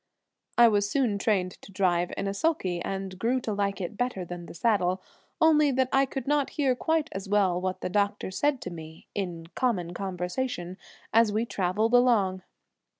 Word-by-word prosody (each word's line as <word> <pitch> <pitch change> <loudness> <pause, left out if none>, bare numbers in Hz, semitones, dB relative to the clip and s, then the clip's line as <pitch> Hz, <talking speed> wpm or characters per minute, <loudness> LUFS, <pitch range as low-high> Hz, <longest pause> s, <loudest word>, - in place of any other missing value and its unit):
I 240 0 +8
was 205 -2 +2
soon 235 -6 +1
trained 190 -3 0
to - - -13
drive 180 -2 +1
in 200 - -2
a 195 - -1
sulky, 200 - 0
and 190 0 -4
grew 245 +5 +1
to 220 - -2
like 200 0 -1
it 190 +3 -5
better 245 -7 -1
than 175 0 -7
the - - -10
saddle, 185 -3 +1 0.4
only 305 -2 +5
that 260 0 +1
I 270 0 +4
could 265 -1 -5
not 290 -1 +2
hear 275 -4 +3
quite 320 +3 0
as 195 0 -6
well 190 -4 +2
what 185 0 -3
the - - -2
doctor 200 0 0
said 285 +6 0
to 180 - -5
me 160 -1 -10
in 175 -4 -4
common 180 -9 0
conversation 185 +1 -3 0.3
as 225 -1 +5
we 220 +3 0
traveled 210 +3 0
along. 220 -7 +4
200 Hz, 185 wpm, -27 LUFS, 185-245 Hz, 0.4 s, I